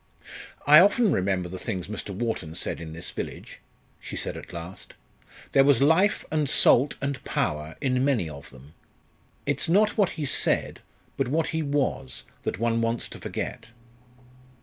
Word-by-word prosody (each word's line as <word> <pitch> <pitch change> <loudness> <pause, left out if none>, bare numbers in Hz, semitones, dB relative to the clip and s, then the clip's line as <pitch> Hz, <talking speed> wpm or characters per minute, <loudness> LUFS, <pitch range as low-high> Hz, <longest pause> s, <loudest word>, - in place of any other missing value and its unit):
"I 150 +1 +9
often 205 +3 +4
remember 95 -1 0
the 90 +1 -7
things 95 -6 -3
Mr. 105 0 -6
Wharton 100 -6 -3
said - - -3
in 80 -1 -7
this 85 +2 -6
village," - - -7 0.4
she - - -8
said - - -3
at - - -9
last. 85 +1 -9 0.6
"There 135 - +6
was 140 -3 +4
life 160 +8 +3
and 150 -3 0
salt 145 -2 +4
and 140 -1 -3
power 75 +1 -2
in 130 -2 +1
many 130 - +1
of 75 0 -10
them. 65 +3 -16 0.7
It's - - -1
not 210 +5 +3
what 200 - +4
he 150 - -2
said, 135 - +1 0.4
but 135 - 0
what 155 +5 0
he 160 - -1
was, 140 - -1 0.2
that - - -3
one 115 +1 +1
wants 115 +1 -1
to - - -10
forget." - - -5
120 Hz, 165 wpm, -26 LUFS, 90-145 Hz, 0.7 s, I